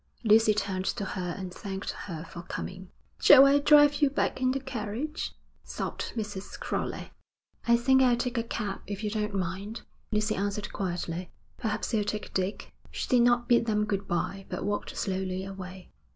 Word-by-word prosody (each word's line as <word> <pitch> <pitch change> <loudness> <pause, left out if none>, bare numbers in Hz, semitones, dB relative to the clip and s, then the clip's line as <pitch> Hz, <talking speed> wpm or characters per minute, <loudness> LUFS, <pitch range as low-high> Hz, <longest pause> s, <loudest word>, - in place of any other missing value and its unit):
Lucy 220 0 +6
turned 195 -2 -1
to 200 - -1
her 180 -2 -3
and 185 -2 -6
thanked 195 0 -4
her 165 -5 -7
for 170 0 -9
coming. 185 +1 -6 0.3
'Shall 275 -1 +9
I 280 +1 +5
drive 290 0 +6
you 290 - +5
back 265 -1 -1
in 255 - +3
the 270 +1 0
carriage?' 260 +4 -4 0.3
sobbed - - -4
Mrs. 205 -3 -5
Crowley. - - -3 0.6
'I 235 0 +6
think 265 +2 +4
I'll 245 -2 +4
take 245 0 -1
a - - 0
cab, 210 -4 -4
if 205 +1 -5
you 210 - -1
don't 210 -1 -2
mind,' 195 +5 -3 0.3
Lucy 215 0 +1
answered 200 +1 -2
quietly. 175 -2 -3 0.3
'Perhaps 220 -1 -2
you'll 215 -2 +3
take 210 +1 -4
Dick.' 190 +2 -2 0.2
She - - -4
did 250 -2 +5
not 240 0 +3
bid 235 -1 +4
them 210 -1 +2
good 200 -1 -2
bye, 195 +3 -2
but - - -3
walked 205 0 -3
slowly 190 -1 -2
away. 185 -1 -9
210 Hz, 180 wpm, -29 LUFS, 190-235 Hz, 0.6 s, Shall